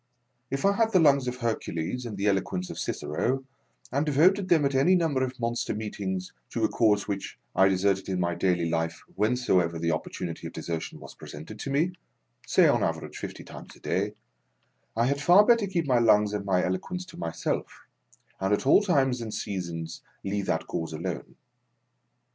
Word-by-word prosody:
If 135 +4 -2
I 200 - +6
had 225 +1 +2
the 185 - +6
lungs 140 -5 +4
of 125 - -2
Hercules 115 -1 -3
and 105 -3 -6
the 100 - -2
elo 100 -2 +3
quence 90 0 -5
of - - -7
Cicero, 130 - -2 0.5
and 140 +3 +1
devoted 180 +7 +3
them 160 -5 +4
at 140 - +1
any 140 +8 +4
number 160 -7 +1
of 130 -1 -4
monster 120 0 -1
meetings 95 -4 -4 0.2
to - - -2
a - - +3
cause 105 -3 +2
which 100 -1 -4 0.2
I 95 - +6
deserted 95 0 +1
in 95 -1 -1
my 85 -1 +1
daily 90 -1 +1
life 80 0 -2
whensoever 100 -6 +2
the 85 0 0
opportunity 80 +1 -4
of - - -10
desertion 80 0 -5
was - - -11
presented 80 +9 -10
to - - -4
me 155 +6 +2 0.6
(say - - +5
on - - +3
an - - +3
average - - -7
fifty - - -7
times - - -11
a - - -18
day), - - -1 0.8
I 115 - +3
had 140 +2 0
far 180 +7 +7
better 230 -3 +4
keep 175 -4 -1
my 125 -3 +3
lungs 105 -3 +4
and 100 -1 -3
my 90 -2 +2
eloquence 135 - -3
to 185 - -13
myself, 85 0 -3 0.6
and 95 +1 0
at - - -6
all 140 - +6
times 135 - +2
and 110 -2 -5
seasons 85 -6 -4 0.2
leave 100 0 -2
that 80 0 0
cause 80 -1 -4
alone. 80 - -5
105 Hz, 190 wpm, -27 LUFS, 90-140 Hz, 0.8 s, far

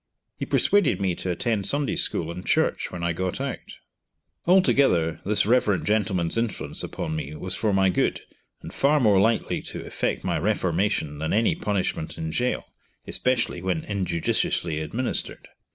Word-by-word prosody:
He - - -5
persuaded 205 -6 +3
me 95 -2 +1
to 90 - -4
attend 100 +3 -1
Sunday 145 0 0
school 85 0 0
and 90 +2 -7
church - - +1
when 85 -1 -6
I 85 0 +1
got 90 +2 -3
out. - - -5 0.7
Altogether 135 - +3
this 105 -1 +3
Rev. 105 -5 +2
gentleman's 95 -3 0
influence 115 -2 -2
upon 80 - -4
me 75 -1 -5
was 95 +5 -3
for 110 - 0
my 95 -1 +3
good, 90 - +1 0.4
and - - -8
far 150 +2 +3
more 105 -7 +4
likely 115 +2 +1
to - - -7
effect - - -2
my - - 0
reformation 80 -8 0
than 80 +1 -1
any 110 +2 +3
punishment 95 -6 -2
in 80 0 -3
gaol, 125 +8 -1 0.4
especially 125 -8 0
when 90 -3 -1
injudiciously 85 -4 -1
administered. 115 +11 -2
95 Hz, 155 wpm, -25 LUFS, 85-115 Hz, 0.7 s, more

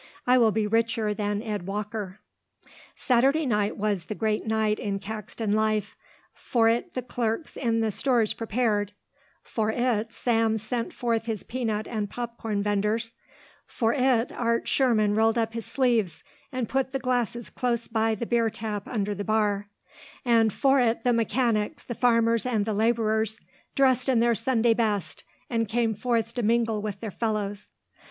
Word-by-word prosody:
"I 250 +1 +5
will 225 -2 +5
be 215 0 0
richer 225 0 +1
than 205 0 -2
Ed 205 -5 -4
Walker." 210 -1 -4 0.7
Saturday 270 +5 +2
night 210 -4 0
was 205 -4 -1
the 215 - -5
great 215 0 -1
night 220 -1 +1
in 200 -1 -2
Caxton 215 +1 -5
life. 215 -1 0 0.4
For 230 -2 +1
it 240 +10 0
the 255 - -2
clerks 235 +3 -3
in 230 -3 0
the 220 -1 +1
stores 230 +1 +1
prepared, 215 -3 -1 0.5
for 220 -2 -1
it 230 -1 0
Sam 225 -2 +1
sent 230 +2 -3
forth 230 -2 -1
his 220 -4 -3
peanut 225 -4 -2
and 210 -3 -3
popcorn 230 -3 -3
venders, 210 +3 0 0.5
for 225 -2 0
it 255 -3 +2
Art 230 -1 -1
Sherman 220 -6 +2
rolled 225 +2 +3
up 225 -1 0
his 230 -1 -5
sleeves 235 -9 +1 0.3
and 255 -3 -2
put 265 +1 -1
the - - +1
glasses 245 -3 -2
close 235 -2 -1
by 225 -1 +1
the 235 - -4
beer 230 -1 +2
tap 215 -2 -5
under 205 -4 -1
the 205 0 -4
bar, 205 -1 0 0.6
and 230 -2 +4
for 275 +5 +3
it 235 -2 +1
the 245 - +3
mechanics, 230 +2 0
the 240 - -5
farmers, 230 -1 +3
and 220 -5 +1
the 220 - -1
labourers 220 0 +1 0.4
dressed 260 -1 +3
in 250 -3 +4
their 235 0 +3
Sunday 230 0 +2
best 215 -4 -1 0.2
and 230 -2 0
came 230 +1 +1
forth 230 +1 -1
to 245 - -2
mingle 225 -1 +1
with 205 -2 -5
their 220 -3 -4
fellows. 210 -2 -3
225 Hz, 165 wpm, -26 LUFS, 215-240 Hz, 0.7 s, I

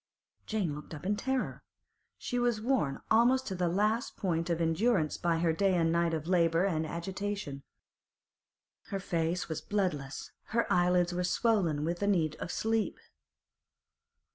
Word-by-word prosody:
Jane 200 -8 -1
looked 150 +2 -8
up 150 - -10
in 205 +2 +1
terror. 265 +4 -2 0.6
She 245 - -2
was 240 -2 +1
worn 225 - 0
almost 245 +4 +4
to 195 - -3
the 180 -1 0
last 215 +8 0
point 170 -3 -1
of 170 -1 0
endurance 165 0 +2
by 170 -1 0
her 165 -1 +2
day 195 +2 +2
and 165 -2 +2
night 170 0 +2
of 155 -1 -4
labour 170 0 +3
and 160 -5 0
agitation. 185 -3 -4 1.2
Her 195 - -4
face 170 -1 -1
was 160 - -4
bloodless, 170 -10 -2 0.3
her 235 - +3
eyelids 180 0 +3
were 180 +1 -1
swollen 180 -6 +1
with 170 +1 -2
the 205 - 0
need 165 -6 +2
of 170 - -5
sleep. 225 +1 0
180 Hz, 155 wpm, -31 LUFS, 165-205 Hz, 1.2 s, almost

